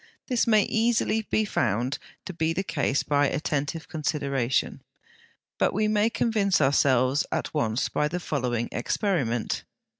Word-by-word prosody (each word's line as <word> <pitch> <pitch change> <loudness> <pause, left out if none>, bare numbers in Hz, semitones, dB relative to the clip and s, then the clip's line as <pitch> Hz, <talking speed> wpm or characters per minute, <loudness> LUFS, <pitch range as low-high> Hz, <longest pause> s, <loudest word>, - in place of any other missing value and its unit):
This 250 -3 0
may 215 -2 +5
be - - -4
easily 225 -1 +2 0.2
found 120 - -1 0.3
to 185 - -6
be 160 0 0
the 190 +4 -2
case 140 -6 0
by 145 -1 +2
attentive 150 +2 -2
consideration, 140 -5 -1 0.8
but - - +2
we 215 +1 +2
may 215 +1 +2
convince 215 -5 +1
ourselves 135 -1 +3
at - - -2
once 115 -5 0
by 150 - 0
the 175 +4 -3
following 125 -8 -2
experiment. 120 - -1
150 Hz, 140 wpm, -26 LUFS, 130-200 Hz, 0.8 s, may